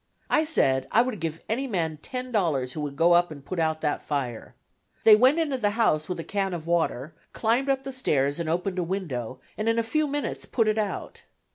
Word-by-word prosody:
I 310 - +4
said 135 - +2
I 230 - +5
would 245 -5 -4
give 165 0 -4
any 260 +5 -1
man 165 -8 -1
ten 255 +2 -5
dollars 150 - 0
who 155 - -4
would 145 -2 -4
go 165 +4 +4
up 175 0 +4
and 140 -3 -10
put 185 - -4
out 160 -1 0
that 150 -2 -1
fire. 130 -6 -4 0.5
They 220 - +9
went 255 +7 +5
into 295 -6 0
the 210 -3 +2
house 155 -9 +2
with 180 - -3
a - - -3
can 195 -1 -1
of 160 -2 -7
water, 160 -4 0 0.2
climbed 235 +5 +1
the 270 0 0
stairs 145 - 0
and 165 -2 -2
opened 180 +3 -1
a - - +1
window, 140 - -4 0.2
and 215 +1 +1
in 230 - +1
a 230 - +2
few 305 +7 0
minutes 290 +1 -3
put 225 -3 +1
it 215 0 +2
out. 210 -2 -4
180 Hz, 225 wpm, -26 LUFS, 155-230 Hz, 0.5 s, They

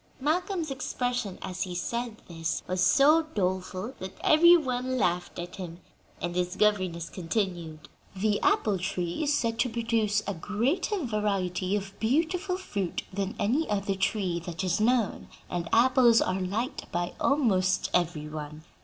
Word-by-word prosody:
Malcolm's 330 +2 -1
expression, 245 -6 -2
as 185 0 -5
he 180 -2 -2
said 235 +5 -3
this, 165 -2 -3
was 185 0 -1
so 280 - +6
doleful 185 +3 -2
that 190 0 -7
every 340 +3 +7
one 255 -3 -2
laughed 175 -5 0
at 175 +1 -6
him; 175 -3 -7 0.4
and 175 0 -3
his 180 0 -1
governess 185 -6 +1
continued: 170 -4 -3 0.3
"The 205 +2 +1
apple 205 -4 +2
tree 175 - -2
is 295 -1 +2
said 230 -1 -1
to 250 - +2
produce 225 -2 0
a 200 - -2
greater 265 - -1
variety 195 -4 -1
of 195 -1 -4
beautiful 335 - +1
fruit 200 - -3
than 200 +3 -2
any 260 +11 +1
other 200 -1 0
tree 190 -2 0
that 170 +1 -5
is 185 +2 0
known, 235 -1 +1 0.2
and 170 -1 -2
apples 240 0 +5
are 185 +1 0
liked 215 +9 -3
by 175 +1 -2
almost 190 -9 +2
every 165 -4 0
one. 150 0 -7
200 Hz, 150 wpm, -28 LUFS, 180-245 Hz, 0.4 s, every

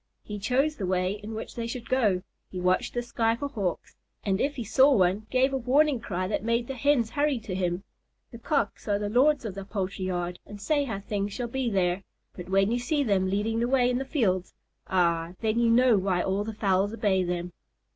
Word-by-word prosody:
He 210 -1 -6
chose 270 +8 +1
the 190 - -3
way 185 0 +1
in 215 +2 -6
which 220 - -6
they 230 -1 -4
should 235 0 -6
go; 210 -8 +2 0.3
he 185 - -6
watched 180 +5 +1
the 240 - -1
sky 230 -1 0
for 285 +4 -4
Hawks, 195 - -4 0.3
and 195 -1 +1
if 285 +1 0
he 245 - -4
saw 260 +7 +5
one, 195 +2 +2
gave 265 +1 +2
a - - +1
warning 270 +2 +3
cry 185 -5 -3
that 205 0 -2
made 230 +1 +1
the 270 - -5
Hens 260 -3 +2
hurry 290 -2 +1
to 215 -3 -6
him. 180 0 -1 0.5
The 235 - -10
Cocks 275 -6 -1
are 205 -1 +2
the 205 0 -3
lords 265 +4 +3
of 210 - -4
the 195 0 -6
poultry 195 -1 -3
yard 180 -1 -3
and 205 - -10
say 290 +6 +1
how 210 -6 -4
things 200 0 -3
shall 240 +2 -4
be 260 0 -1
there; 185 -2 +1 0.3
but 180 0 -8
when 195 +2 +3
you 240 - +1
see 285 +4 0
them 195 -6 +1
leading 215 +4 0
the 235 - +1
way 250 -1 +3
in 250 - 0
the - - -2
fields, 200 - 0 0.3
ah, 170 -2 +1
then 220 +1 +1
you 235 -1 +3
know 235 -2 +5
why 185 -2 0
all 195 +2 0
the 220 - -4
fowls 195 -1 +1
obey 200 -4 +2
them. 175 0 -3
215 Hz, 225 wpm, -27 LUFS, 190-245 Hz, 0.5 s, saw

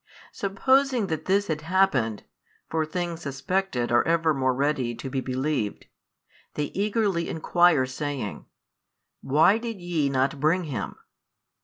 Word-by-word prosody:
Supposing 255 +4 +2
that 155 0 -5
this 200 +2 +2
had 155 -5 -3
happened 155 - +1 0.5
(for 160 -1 0
things 170 0 -3
suspected 140 -2 -2
are 120 - +5
evermore 160 -6 +2
ready 135 -3 0
to 135 - -6
be 135 - -1
believed) 130 -4 -2 0.7
they 150 -1 -2
eagerly 200 -4 0
enquire 165 -3 +3
saying, 130 -4 -5 0.7
Why 160 +10 +4
did 230 -3 -5
ye 170 -5 0
not 135 +1 0
bring 165 +5 +2
Him? 125 - -4
155 Hz, 125 wpm, -26 LUFS, 135-185 Hz, 0.7 s, are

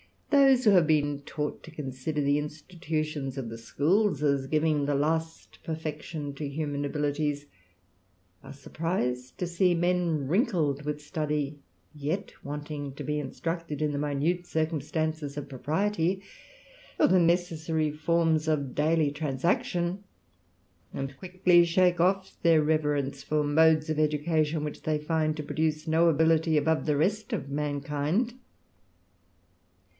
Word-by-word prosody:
Those 270 -3 +5
who 210 - +7
have 180 -5 +5
bet 145 -2 +1
taught 150 -1 -3
to 165 - -12
consider 150 0 -4
the 140 +1 +2
institutions 155 -2 -4
of 125 -4 -4
the 115 - -7
schools, 150 - +1
as 140 -2 +1
givii 155 -1 +1
the 145 - +1
last 160 +3 -2
perfection 155 -2 -5
to 145 +1 -4
human 145 0 -3
abilities, 145 0 -1 1.0
are - - -10
surprised 130 -4 -3
"•o 180 - -2
see 175 +1 +2
men 170 -4 +1
wrinkled 165 - +1
with 150 0 -3
study, 150 -2 -2 0.3
yet 155 +6 -3
wanting 145 -1 -5
to - - -6
be 150 - -2
instruct^^ 165 +2 -4
in 150 -1 0
the 145 - -2
minute 150 +5 -1
circumstances 155 -2 -2
of 145 - -5
propriety, 170 +7 -1 0.8
or - - +6
the 185 - +4
necessatiy 165 -3 +1
forms 160 0 +1
of 140 -5 0
daily 155 0 +2
transaction; 170 +5 -1 0.9
and 135 0 -4
quickly 180 -1 +4
shake 180 +1 +3
oflf 190 +2 +1
th^/r 165 -3 +5
reverence 145 -3 0
for 150 0 0
modes 155 +1 +4
of 155 -1 0
education, 155 0 +1
which 150 - -5
they 155 -1 0
find 155 0 0
to 150 - -4
produce 155 +1 -1
no 165 +2 +4
ability 160 0 +3
above 160 +1 +1
the 150 -1 +2
rest 205 +7 0
of 140 -1 -3
mankind. 150 - -1
155 Hz, 135 wpm, -28 LUFS, 145-165 Hz, 1.0 s, who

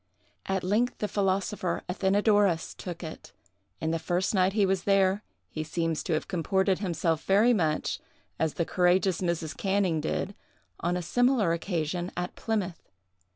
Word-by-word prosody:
At 190 -1 0
length 215 +7 +1
the 210 - -1
philosopher 195 -2 -1
Athenadorus 195 -1 +2
took 175 -1 -7
it; 160 - -9 0.5
and 160 +1 -1
the 165 - 0
first 180 +5 0
night 190 -1 +3
he 205 -2 +3
was 190 -1 0
there, 195 0 +3 0.3
he 155 - -4
seems 165 0 -1
to 170 - 0
have 155 - -1
comported 190 +2 +1
himself 165 -4 0
very 210 +5 +5
much 160 -8 0 0.4
as 160 -2 0
the 170 - 0
courageous 180 0 +2
Mrs. 170 -3 -2
Canning 190 -5 +1
did, 160 +5 -2 0.5
on 175 +1 0
a 180 - -3
similar 245 -3 +2
occasion, 175 0 -2
at 180 0 -3
Plymouth. 200 -6 -3
185 Hz, 155 wpm, -28 LUFS, 165-200 Hz, 0.5 s, very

